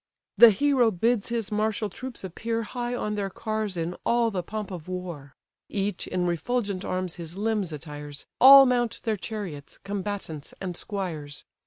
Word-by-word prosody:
The 235 - +10
hero 260 +1 +3
bids 225 +3 +1
his 230 -3 -2
martial 215 0 0
troops 250 +5 -8
appear 225 +5 -3
High 240 +2 -3
on 210 -3 -2
their 200 -2 -2
cars 215 -1 -3
in 170 +2 -2
all 235 -1 +2
the 185 -3 -1
pomp 210 +2 -5
of 175 -3 -7
war; 175 -7 -6 0.3
Each 200 -2 -2
in 180 -1 -1
refulgent 195 +3 -1
arms 185 -2 -3
his 170 +1 -7
limbs 210 -4 0
attires, 145 -1 -8
All 275 +1 +11
mount 240 -3 0
their 220 -2 0
chariots, 190 -8 -6
combatants 195 -6 -5
and 180 -2 -4
squires. 165 -8 -5
200 Hz, 160 wpm, -26 LUFS, 175-225 Hz, 0.3 s, All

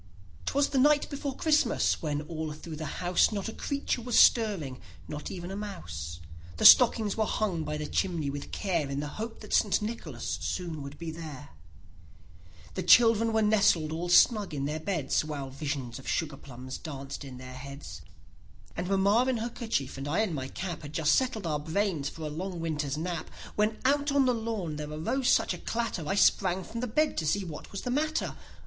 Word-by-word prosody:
E. 95 -3 -23
McC. - - 0
was 285 0 +3
the 270 - +1
night 295 +2 +4
before 280 -1 -3
Christmas, 300 -6 +2
when 150 -2 -1
all 160 -1 -4
through 155 +1 -8
the 155 +3 -5
house 180 +4 +4
Not 205 -1 -3
a 225 - -5
creature 280 -3 -2
was 240 0 0
stirring, 190 - +4 0.3
not 150 0 -6
even 175 0 -6
a - - -4
mouse; 85 - -6 0.4
The - - 0
stockings 225 -4 +8
were 220 -1 +1
hung 185 -7 -1
by 150 0 -3
the 150 - -4
chimney 170 -2 -1
with 145 0 -7
care 170 -8 -1
In 140 0 -2
hopes 220 +10 -6
that 210 - -7
St. 205 - +3
Nicholas 225 +2 -4
soon 170 -5 -3
would 140 +1 -8
be 165 -1 -5
there; 155 -5 -8 1.3
he 185 - -1
children 225 +4 +6
were 220 0 +2
nestled 195 -7 +3
all 170 +2 -3
snug 205 -2 +5
in 140 -1 -2
their 150 +2 -2
beds, 160 -6 0
While 145 -3 -5
visions 140 -3 -4
of 135 - -12
sugar 155 -4 -1
plums 130 -1 -8
danced 140 -2 -7
in 130 -2 -9
their 130 0 -9
heads; 130 - -9 0.7
And 180 +1 -3
mamma 200 +6 +3
in 255 - +1
her 230 +2 -2
kerchief, 220 - -3
and 135 - -5
I 170 +9 +1
in 210 -6 -1
my 130 -3 -3
cap, 175 +2 -5
Had 145 0 -9
just 155 -1 +3
settled 250 -7 +1
our 150 -2 0
brains 160 -2 -1
for 160 - -9
a - - -2
long 175 +4 -4
winter's 150 -3 -2
nap, 170 0 -3 0.3
hen 215 +1 +1
out 285 +1 +3
on 280 -1 +4
the 250 - +3
lawn 220 -9 -3
there 150 0 -5
arose 230 - -1
such - - +3
a - - -7
clatter, 225 -9 -3
I 195 - 0
sprang 190 -1 +3
from 230 - -6
the 250 - -2
bed 300 +7 +1
to 160 - -2
see 195 +5 +1
what 155 -3 -8
was 200 - -5
the 250 - -2
matter. 305 +4 0
175 Hz, 205 wpm, -29 LUFS, 150-220 Hz, 1.3 s, stockings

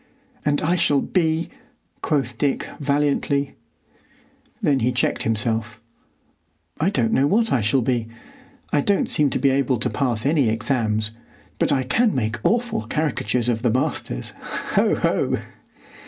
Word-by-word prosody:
"And 145 0 +1
I 170 +4 +2
shall 145 -4 +3
be——" 160 -1 0 0.5
quoth 135 -5 -1
Dick, 140 -2 0
valiantly. 140 -1 0 1.1
Then 140 -2 +2
he 120 +1 +1
checked 125 - 0
himself: 110 0 -1 1.0
"I 165 +6 +2
don't 120 - 0
know 135 +2 +3
what 225 +6 +2
I 130 - +2
shall 115 +5 +2
be. 120 -2 0 0.7
I 145 - +4
don't 200 +6 +1
seem 150 -2 +3
to - - -1
be 140 - +3
able 130 -1 +1
to 120 - -2
pass 120 -5 0
any 140 -5 +3
exams, 110 -2 0 0.5
but - - +2
I 135 -2 +2
can 215 - +2
make 115 -2 -1
awful 235 0 0
caricatures 125 -6 -1
of 115 -2 0
the 120 - +2
masters. 110 - -1 0.4
Ho! - - +3
Ho!" - - 0
135 Hz, 145 wpm, -22 LUFS, 115-150 Hz, 1.1 s, I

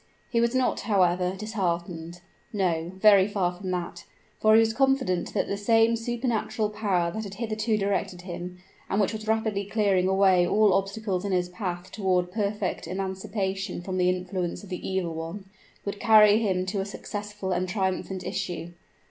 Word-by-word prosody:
He 235 -2 +2
was 235 +2 +1
not, 255 -1 +1
however, 180 -3 +2
disheartened. 175 -5 -3 0.3
No 175 -5 -1
very 200 -1 +6
far 190 -4 0
from 185 +1 -7
that; 175 -1 -4 0.3
for 215 0 +5
he - - +8
was 225 0 +3
confident 265 -9 +1
that - - +2
the 200 - -2
same 225 +2 +3
supernal 230 -2 -1
power 195 -5 0
that 220 +4 -4
had 200 -1 -7
hitherto 215 0 -1
directed 195 -3 -1
him, 180 0 -6 0.3
and 195 - +1
which 205 +1 +1
was 215 0 -6
rapidly 220 -2 0
clearing 200 -3 +1
away 190 -2 +4
all 210 +1 +4
obstacles 195 0 -1
in 200 - -2
his 180 -1 +1
path 180 -2 -5
toward 185 -3 0
perfect 205 -4 -2
emancipation 190 0 -3
from 185 0 -3
the 180 0 +3
influence 180 0 -2
of 200 - -11
the 180 0 -5
evil 185 -3 -1
one, 165 +5 -6 0.4
would 200 0 -4
carry 215 -1 +6
him 190 -4 0
to 195 +1 -2
a - - -3
successful 205 -1 -5
and 180 0 0
triumphant 190 -1 -2
issue. 175 -1 -4
195 Hz, 170 wpm, -26 LUFS, 180-215 Hz, 0.4 s, he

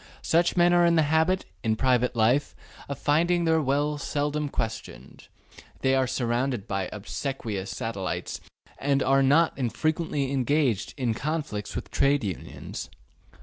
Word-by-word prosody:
Such 170 +2 +2
men 175 0 +5
are 175 0 +5
in 170 0 +4
the 160 - +4
habit, 160 +5 +2 0.2
in 110 0 +1
private 125 0 +2
life, 120 +6 +2 0.3
of 140 - -3
finding 170 +4 +2
their 160 -1 +3
will 145 +2 0
seldom 145 +1 -1
questioned; 110 - -6 0.5
they 130 0 +2
are 130 -1 +2
surrounded 120 -2 -1
by 95 -2 -2
obsequious 105 -1 -4
satellites 100 -5 -4 0.4
and 140 0 +1
are 135 +1 +4
not 145 +5 +4
infrequently 150 +2 -1
engaged 135 -5 +1
in 125 -4 0
conflicts 145 -6 -3
with - - -5
Trade 140 -1 +2
Unions. 95 -5 -6
135 Hz, 140 wpm, -26 LUFS, 115-155 Hz, 0.5 s, men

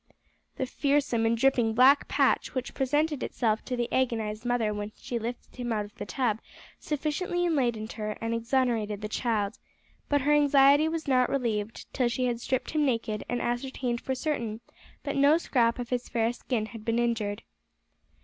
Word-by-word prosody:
The 260 - -1
fearsome 275 -4 +1
and 230 +1 +2
dripping 240 -3 +2
black 265 +4 +6
patch - - +1
which 255 -1 -3
presented 290 +1 0
itself 220 -2 0
to 255 - -2
the 240 -1 0
agonised 225 -3 -1
mother 235 -3 +1
when 205 0 -4
she 240 - -4
lifted 235 +3 -6
him 245 -1 -3
out 210 -2 0
of 205 - -15
the - - -7
tub 220 +2 0 0.4
sufficiently 310 +4 -1
enlightened 240 -9 0
her 215 -1 -4
and 225 0 -2
exonerated 230 -3 0
the 210 - -3
child, 215 -1 -1 0.5
but 285 -1 +3
her 295 +3 +3
anxiety 285 +1 +5
was 320 -1 -4
not 255 -2 +3
relieved 225 -5 -2
till 250 -3 +1
she 250 +2 -1
had 240 -1 -1
stripped 260 +1 -1
him 305 -1 +1
naked 230 -5 -1
and 245 0 -1
ascertained 245 0 -2
for 265 - -2
certain 235 -6 -2 0.4
that 280 - -3
no 285 +3 +6
scrap 235 -8 +1
of 245 -1 -5
his 250 -1 -2
fair 230 0 +1
skin 240 -3 -2
had 220 0 -10
been 230 +1 0
injured. 225 -3 -1
245 Hz, 180 wpm, -28 LUFS, 225-270 Hz, 0.5 s, black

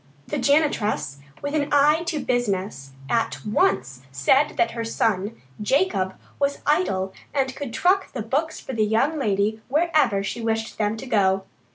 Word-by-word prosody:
The - - -1
janitress, 260 - +1 0.2
with 285 +1 -3
an 295 -1 0
eye 295 +2 +5
to 335 -2 -1
business, 200 - -2
at 230 +3 -1
once 130 - +1
said 265 - +2
that 350 - +2
her 230 - -4
son, 220 -1 -1 0.2
Jacob, 210 - +1 0.2
was 280 0 +1
idle 195 - +1 0.2
and 265 -2 0
could 285 -5 -5
truck 370 - +2
the 240 - -4
books 290 +8 -1
for 265 - -7
the 220 -2 +1
young 250 +9 +1
lady 210 -1 0
wherever 295 - +2
she 215 +4 -4
wished 225 -1 -2
them 210 +1 0
to 265 - -7
go. 195 -5 +2
230 Hz, 160 wpm, -24 LUFS, 200-285 Hz, 0.2 s, eye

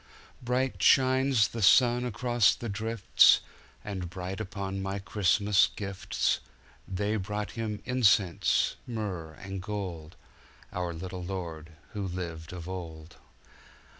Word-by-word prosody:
Bright 125 -4 -1
shines 130 -1 +4
the 115 - -5
sun 120 +4 +5
across 120 0 +2
the 120 - -6
drifts, 110 0 +4 0.4
And 95 -4 -4
bright 90 +2 -5
upon 95 -1 -4
my 95 +1 -3
Christmas 100 +1 +3
gifts. 95 -2 -2 0.5
They 105 +3 -1
brought 105 -1 -4
Him 105 0 -4
incense, 110 -8 +2
myrrh, 100 -9 -4
and 95 +4 -7
gold, 90 -6 -5 0.6
Our 90 -1 -2
little 90 +2 -6
Lord 85 -4 -6 0.2
who 100 -2 -3
lived 85 -3 -6
of 90 -2 -7
old. 85 -3 -8
95 Hz, 115 wpm, -29 LUFS, 90-110 Hz, 0.6 s, sun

